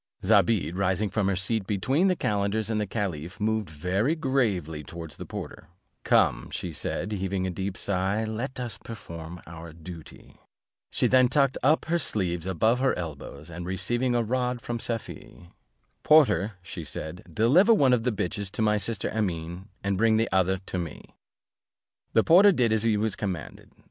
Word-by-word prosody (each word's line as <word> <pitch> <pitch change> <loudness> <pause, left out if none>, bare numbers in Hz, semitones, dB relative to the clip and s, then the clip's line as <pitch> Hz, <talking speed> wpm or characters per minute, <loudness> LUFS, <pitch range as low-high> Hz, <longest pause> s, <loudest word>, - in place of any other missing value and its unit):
Zobeide, 95 -5 +3
rising 95 +2 0
from 105 -3 0
her 100 - +1
seat 95 +2 0
between 130 - +1
the 185 - +3
calenders 105 -2 0
and 105 -1 0
the 105 - -2
caliph, 90 -4 -4
moved 110 -2 0
very 95 - 0
gravely 105 - 0
towards 80 +1 -8
the - - -9
porter; - - -7 0.4
"Come," - - +2
said 90 +4 -3
she, - - -1
heaving 95 0 -1
a 95 - -1
deep 95 +1 -4
sigh, 100 +2 0
"let 115 +5 -4
us 120 -2 -5
perform 85 -6 -9
our 85 0 -9
duty:" 85 0 -12 0.5
she - - 0
then 130 -1 +5
tucked 135 +1 +2
up 150 +4 +3
her 170 +1 +1
sleeves 90 - -2
above 110 +7 +2
her 130 0 +1
elbows, 75 -1 -7
and 85 +1 -6
receiving 120 +7 0
a 120 - +2
rod 125 +1 -1
from 120 0 -4
Safie, 110 -6 -5 0.5
"Porter," 145 -9 +4
said 80 0 -6
she, - - -15
"deliver 140 - +5
one 140 - +5
of 120 - +3
the 125 +2 0
bitches 100 -1 -2
to 110 - -1
my 105 0 +3
sister 100 0 -2
Amene, 90 -3 -3 0.2
and 100 -1 0
bring 110 0 +4
the 115 +1 +1
other 95 +1 +2
to 90 - -3
me." 85 -3 -7 1.0
The 110 - +5
porter 195 +5 +7
did 125 - +2
as 110 - +2
he 110 -1 +2
was 110 0 0
commanded. 95 -6 -5
100 Hz, 175 wpm, -27 LUFS, 90-115 Hz, 1.0 s, porter